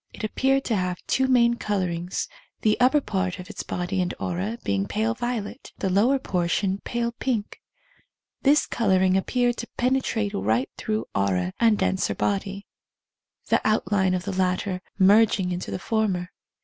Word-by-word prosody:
It -, -, -9 dB
appeared 270 Hz, +5 st, +1 dB
to 230 Hz, -, 0 dB
have 180 Hz, -2 st, -1 dB
two 265 Hz, 0 st, +1 dB
main 235 Hz, -2 st, +4 dB
colourings, 180 Hz, -4 st, -2 dB, 0.3 s
the 215 Hz, -1 st, +3 dB
upper 260 Hz, +4 st, +4 dB
part 190 Hz, -6 st, -2 dB
of 180 Hz, -, -8 dB
its -, -, -5 dB
body 180 Hz, +2 st, -2 dB
and 180 Hz, -, -2 dB
aura 190 Hz, +6 st, -2 dB
being 100 Hz, 0 st, 0 dB
pale 220 Hz, +2 st, 0 dB
violet, 240 Hz, -1 st, -4 dB
the 190 Hz, -, -1 dB
lower 230 Hz, +9 st, +4 dB
portion 190 Hz, -3 st, -1 dB
pale 235 Hz, +1 st, -2 dB
pink. 235 Hz, -3 st, -3 dB, 0.8 s
This 290 Hz, +2 st, +4 dB
colouring 190 Hz, -4 st, +2 dB
appeared 245 Hz, +5 st, +1 dB
to 235 Hz, -, -5 dB
penetrate 245 Hz, -4 st, 0 dB
right 110 Hz, +6 st, 0 dB
through 215 Hz, 0 st, -2 dB
aura 95 Hz, -2 st, 0 dB
and 225 Hz, -2 st, +4 dB
denser 190 Hz, -2 st, 0 dB
body, 200 Hz, 0 st, -2 dB, 0.8 s
the -, -, +3 dB
':'\:tline 200 Hz, -3 st, +2 dB
of 180 Hz, -, -3 dB
the 195 Hz, 0 st, -4 dB
latter 185 Hz, 0 st, 0 dB, 0.2 s
merging 200 Hz, -1 st, +4 dB
into 180 Hz, 0 st, -4 dB
the -, -, -3 dB
former. 190 Hz, -4 st, -1 dB
200 Hz, 155 wpm, -25 LUFS, 185-235 Hz, 0.8 s, main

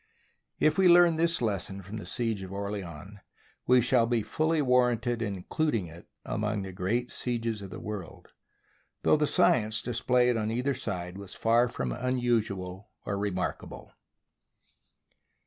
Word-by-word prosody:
If 155 Hz, +3 st, +3 dB
we 190 Hz, -, +6 dB
learn 175 Hz, -2 st, +6 dB
this 165 Hz, -4 st, +1 dB
lesson 100 Hz, -2 st, -2 dB
from 100 Hz, +5 st, -7 dB
the 105 Hz, -, -8 dB
siege 115 Hz, -4 st, -2 dB
of 95 Hz, -1 st, -8 dB
Orleans, 100 Hz, -2 st, -6 dB, 0.5 s
we 125 Hz, 0 st, +6 dB
shall 120 Hz, -1 st, +3 dB
be 115 Hz, -2 st, +1 dB
fully 160 Hz, +5 st, 0 dB
warranted 125 Hz, -3 st, +2 dB
in 100 Hz, -3 st, -2 dB
including 115 Hz, -, -1 dB
it 85 Hz, +1 st, -13 dB, 0.2 s
among 105 Hz, -1 st, -2 dB
the 95 Hz, -, -6 dB
great 110 Hz, +7 st, -2 dB
sieges 115 Hz, -3 st, -2 dB
of 100 Hz, -, -8 dB
the -, -, -8 dB
world, 100 Hz, -5 st, -7 dB, 0.7 s
though -, -, +5 dB
the 150 Hz, -1 st, +1 dB
science 110 Hz, -5 st, +3 dB
displayed 125 Hz, 0 st, +2 dB
on 110 Hz, -1 st, -1 dB
either 125 Hz, +5 st, 0 dB
side 90 Hz, -5 st, -5 dB
was 100 Hz, -1 st, -7 dB
far 120 Hz, +2 st, +3 dB
from -, -, -3 dB
unusual 115 Hz, -7 st, -1 dB, 0.2 s
or 100 Hz, -, -2 dB
remarkable. 100 Hz, -3 st, -4 dB
115 Hz, 145 wpm, -29 LUFS, 100-125 Hz, 0.7 s, we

